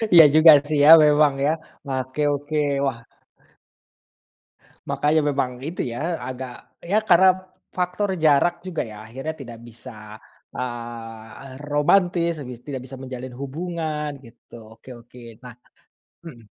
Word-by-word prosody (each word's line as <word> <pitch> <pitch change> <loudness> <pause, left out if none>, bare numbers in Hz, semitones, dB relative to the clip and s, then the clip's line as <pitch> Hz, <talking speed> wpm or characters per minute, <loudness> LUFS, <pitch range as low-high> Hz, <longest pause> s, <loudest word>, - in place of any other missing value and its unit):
Iya 165 - +11
juga 155 +1 +9 0.2
sih 155 0 0
ya - - +7 0.2
memang 150 -1 +4
ya. 150 - +3 0.3
Nah 135 -1 -3
oke 130 +3 -6
oke, 145 +2 -4 0.3
wah. 120 -4 -3 1.8
Makanya 155 +2 +1
memang 135 -2 -1 0.2
itu 170 - -4
ya 165 +8 -3
agak 130 -1 -9
ya 190 +5 -1
karena 185 +2 +6 0.5
faktor 180 +3 -2
jarak 165 +4 +3
juga 180 -4 -3
ya, 105 -1 -11
akhirnya 135 +8 -6
tidak 120 -3 -10
bisa, 110 -2 -12 0.4
eee, 120 +1 -8 0.2
romantis 170 +3 +2 0.2
gi 125 - -7
tidak 135 -3 -5
bisa 135 - -9
menjalin 130 -1 -8
hubungan, 155 +1 -4 0.2
gitu. 115 0 -17 0.2
Oke 130 - -16
oke 120 +1 -17 0.2
nah 125 -1 -10 0.7
mhm? 120 -8 -12
140 Hz, 130 wpm, -22 LUFS, 125-160 Hz, 1.8 s, Iya